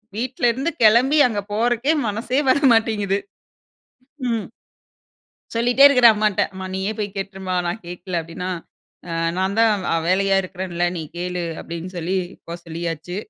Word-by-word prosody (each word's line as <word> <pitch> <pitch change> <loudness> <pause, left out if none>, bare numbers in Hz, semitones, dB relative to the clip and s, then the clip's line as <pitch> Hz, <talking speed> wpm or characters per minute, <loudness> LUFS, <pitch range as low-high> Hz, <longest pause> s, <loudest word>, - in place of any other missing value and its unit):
வீட்ல 250 +2 -4
இருந்து 270 +7 -2
கெளம்பி 245 +7 +5
அங்க 215 -4 -2
போறக்கே 240 +6 +1
மனசே 230 +6 -1
வர 260 - +5 0.2
மாட்டேங்குது 215 -3 +1 1.1
ம். 225 -4 -1 1.1
சொல்லிட்டே 245 +4 +3
இருக்குறேன் 250 -5 +6
அம்மாட்ட. 210 -2 +1
"அம்மா 190 0 -6
நீயே 190 +2 -1
போய் 205 -2 -4
கேட்டுருமா, 190 -1 -4
நான் 175 +6 -4
கேட்கல" 175 0 -4
அப்டின்னா 175 +3 -6 0.6
ஆ - - -2 0.2
"நான் 190 +2 0
தான் 210 -4 +3
அ - - +2
வேலையா 195 +2 +2
இருக்கிறேன்ல, 180 -2 -3
நீ - - -4 0.2
கேளு" 180 0 -3 0.2
அப்டின் 170 +1 -6
சொல்லி, 175 +3 -1 0.3
போ 170 - -5
சொல்லியாச்சு. 165 +1 -5
195 Hz, 140 wpm, -21 LUFS, 180-230 Hz, 1.1 s, இருக்குறேன்